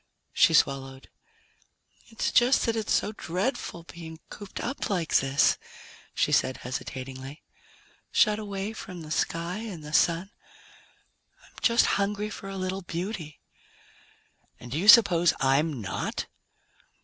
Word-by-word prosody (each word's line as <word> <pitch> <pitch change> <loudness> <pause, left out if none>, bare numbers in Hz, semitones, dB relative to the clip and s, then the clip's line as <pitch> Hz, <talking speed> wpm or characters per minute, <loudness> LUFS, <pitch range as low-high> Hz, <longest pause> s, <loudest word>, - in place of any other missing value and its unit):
She - - +5
swallowed. 135 -1 0 1.0
"It's 225 -1 -2
just 250 +2 +4
that 230 -2 0
it's 220 -2 -2
so - - +2
dreadful 190 -1 -3
being 160 -1 -10
cooped 205 -2 -8
up 260 +4 -3
like 175 -5 +1
this," 135 +1 +2 0.6
she - - +1
said 130 - +2
hesitatingly, 130 +3 -6 0.7
"shut 210 -2 +3
away 200 0 -4
from 180 -5 -8
the 155 - -10
sky 170 +3 -1
and 200 -8 -7
the 150 0 -9
Sun. 170 +5 +2 1.1
I'm - - -23
just 235 0 +4 0.2
hungry 210 +1 -2
for 195 - -8
a 195 - -6
little 185 +1 -3
beauty." 175 -3 -5 1.2
"And 120 - -11
do 145 - -1
you 195 - -1
suppose 180 -7 +7
I'm 135 +1 +2
not?" 90 -5 -3
175 Hz, 130 wpm, -27 LUFS, 150-210 Hz, 1.2 s, suppose